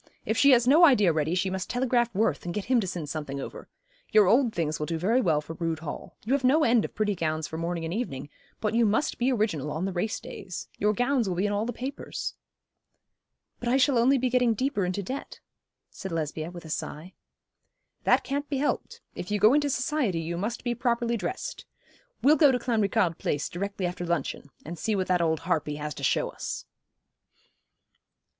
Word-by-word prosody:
If 220 - 0
she 280 - +5
has 245 -2 +5
no 305 +6 +6
idea 210 - +6
ready 155 +2 0
she 185 +1 0
must 190 -1 -3
telegraph 245 -1 +1
Worth 190 -7 +1
and 175 - -4
get 210 - -2
him 255 0 +3
to 200 - -2
send 175 -4 -4
something 145 -2 -4
over. - - -8 0.4
Your 215 -1 +6
old 235 +5 +4
things 155 -5 -2
will 150 - -2
do 165 - -1
very 220 +10 +2
well 160 -8 +2
for 150 +2 -8
Rood 165 -1 -2
Hall. 155 -2 -7
You 245 - +1
have 280 -1 +1
no 290 +5 +4
end 235 -3 +4
of - - -6
pretty 210 -1 +1
gowns 155 -3 -1
for 160 - -6
morning 170 0 -2
and 165 - -3
evening; 145 - -3 0.3
but 215 0 -1
you 235 +1 +4
must 220 +8 0
be 250 +2 +2
original 205 - 0
on 160 +5 -2
the 195 - -2
race 190 +5 -1
days. 185 -2 -8
Your 210 +1 +3
gowns 245 0 +1
will 180 - -1
be 185 +4 0
in 205 - 0
all 210 +3 -1
the - - -1
papers.' 260 +4 -5 1.3
'But 240 - -2
I 255 - +4
shall 275 +1 +4
be 235 - +3
only 270 +3 +4
getting 250 -2 +2
deeper 255 -5 0
into 185 +3 -2
debt,' 265 +9 -6 0.5
said 190 - -7
Lesbia, 155 0 -3
with 175 -1 -10
a - - -9
sigh. 155 +4 -5 0.9
'That - - +4
can't 285 +2 -3
be 280 - -1
helped. 290 +2 -2
If 180 - -6
you 210 - +1
go 215 +5 +6
into 290 0 +2
society 255 - 0
you 165 +1 -3
must 210 +7 -3
be 240 - 0
properly 235 -1 0
dressed. 380 - -5 0.6
We'll 300 +3 +6
go 285 -2 +6
to 250 - +2
Clanricarde 210 -8 +1
Place 145 - -1
directly 195 +1 -3
after 175 0 -3
luncheon, 170 -4 -2 0.2
and 165 +2 -7
see 220 +3 0
what 190 -1 0
that 180 -1 +3
old 160 -2 +1
harpy 160 -3 -1
has 150 0 -4
to 140 - -9
show - - +1
us.' - - -6
205 Hz, 215 wpm, -27 LUFS, 165-245 Hz, 1.3 s, no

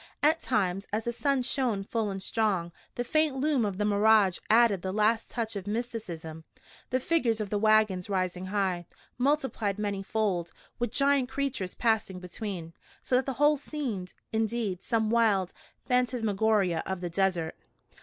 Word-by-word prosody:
At 315 +2 +4
times, 195 -4 0
as 215 +2 -1
the 235 - -1
sun 270 +2 0
shone 245 -6 -1
full 220 +1 -1
and 195 -1 -4
strong, 195 -7 0 0.2
the 245 - -1
faint 310 +2 +1
loom 275 -2 +1
of 200 -3 -2
the 210 - 0
mirage 205 -2 +4
added 225 -4 +5
the 190 - -3
last 215 +3 +1
touch 225 -3 -3
of 200 -1 -5
mysticism, 195 -9 -4 0.5
the 255 - +1
figures 255 -7 +1
of 210 -2 -4
the 205 - +1
wagons 215 -3 +3
rising 185 -1 -1
high, 185 -3 -1 0.3
multiplied 260 -7 0
many 205 -2 -2
fold, 195 -4 -1 0.3
with 240 -2 -1
giant 275 -1 +2
creatures 265 -9 -2
passing 220 -5 0
between, 180 -2 -6 0.3
so 250 - +1
that 255 +1 +2
the 270 - -1
whole 295 +1 +4
seemed, 255 -11 -5 0.2
indeed, 220 -4 -1
some 220 -2 0
wild 210 -6 +2 0.3
phantasmagoria 220 -7 +1
of 190 -1 -3
the 175 - -3
desert. 180 -3 0
215 Hz, 160 wpm, -29 LUFS, 190-240 Hz, 0.5 s, added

